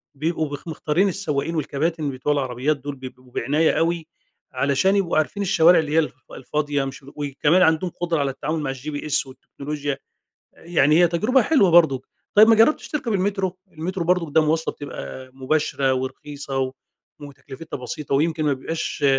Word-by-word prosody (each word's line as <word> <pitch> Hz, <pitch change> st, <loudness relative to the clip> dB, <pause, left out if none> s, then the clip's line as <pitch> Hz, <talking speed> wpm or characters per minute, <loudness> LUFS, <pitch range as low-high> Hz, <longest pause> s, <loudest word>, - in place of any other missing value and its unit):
بيبقوا 155 Hz, +1 st, -1 dB
بخ 145 Hz, +3 st, -8 dB
مختارين 160 Hz, +3 st, 0 dB
السواقين 165 Hz, -4 st, -2 dB
والكباتن 155 Hz, 0 st, -1 dB
بِتوع 135 Hz, +3 st, -1 dB
العربيات 135 Hz, +1 st, -1 dB
دول 140 Hz, +1 st, -6 dB
بيبقوا 130 Hz, -1 st, -11 dB
بعناية 150 Hz, +7 st, +1 dB
أوي، 165 Hz, -1 st, 0 dB, 0.5 s
علشان 140 Hz, +9 st, +2 dB
يبقوا 195 Hz, -6 st, +1 dB
عارفين 180 Hz, +6 st, 0 dB
الشوارع 175 Hz, -3 st, +5 dB
اللي 155 Hz, -2 st, -2 dB
هي 160 Hz, -, +4 dB
الف 155 Hz, -, -1 dB, 0.2 s
الفاضية 145 Hz, +1 st, -2 dB
مش 135 Hz, 0 st, -8 dB
و 140 Hz, -, -13 dB
وكمان 145 Hz, +4 st, +1 dB
عندهم 160 Hz, +1 st, +3 dB
قدرة 170 Hz, -2 st, 0 dB
على 140 Hz, -1 st, 0 dB
التعامل 150 Hz, +4 st, -3 dB
مع 140 Hz, -3 st, -2 dB
الGPS 145 Hz, +2 st, -2 dB
والتكنولوجيا. 140 Hz, +1 st, -5 dB, 0.6 s
يعني 160 Hz, -2 st, +2 dB
هي 175 Hz, -, +6 dB
تجربة 215 Hz, +11 st, +2 dB
حلوة 265 Hz, -, +4 dB
برضو. 155 Hz, -6 st, +5 dB, 0.3 s
طيب، 215 Hz, +1 st, +8 dB
ما 225 Hz, -, +7 dB
جربتش 225 Hz, +8 st, +3 dB
تركب 270 Hz, -7 st, -2 dB
المترو؟ 190 Hz, -1 st, -1 dB
المترو 175 Hz, +3 st, -4 dB
برضو 175 Hz, -2 st, +1 dB
ده 160 Hz, +2 st, +4 dB
مواصلة 160 Hz, +1 st, 0 dB
بتبقى 130 Hz, -2 st, -8 dB
مباشرة 135 Hz, 0 st, 0 dB
ورخيصة 135 Hz, +1 st, -4 dB
و 130 Hz, 0 st, -1 dB, 0.5 s
وتكلفتها 140 Hz, +2 st, -9 dB
بسيطة 135 Hz, +3 st, -3 dB
ويمكن 155 Hz, +2 st, +1 dB
ما 145 Hz, -, +3 dB
بيبقاش 145 Hz, +2 st, -3 dB
150 Hz, 165 wpm, -22 LUFS, 140-170 Hz, 0.6 s, طيب